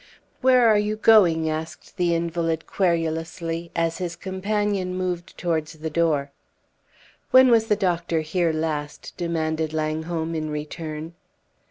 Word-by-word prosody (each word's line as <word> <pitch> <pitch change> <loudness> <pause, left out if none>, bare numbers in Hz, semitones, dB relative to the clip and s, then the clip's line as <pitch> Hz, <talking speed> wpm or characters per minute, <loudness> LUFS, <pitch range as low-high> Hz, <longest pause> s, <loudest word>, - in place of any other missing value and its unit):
"Where 255 -2 +5
are 215 -2 +5
you 210 +1 -1
going?" 185 -8 +5
asked 160 +4 -5
the 175 -2 +2
invalid, 165 -1 -1
querulously, 165 -1 -1
as 165 -1 0
his 175 -2 -3
companion 190 0 -2
moved 180 -1 -4
towards 160 -3 -1
the 160 0 -6
door. 150 -4 +1 1.0
"When 260 0 +7
was 225 -1 +4
the 210 - +3
doctor 175 -4 0
here 165 +2 0
last?" 155 -2 -4
demanded 160 -2 -2
Langholm 160 +1 -2
in 155 -1 -3
return. 155 +1 -5
165 Hz, 130 wpm, -24 LUFS, 160-185 Hz, 1.0 s, When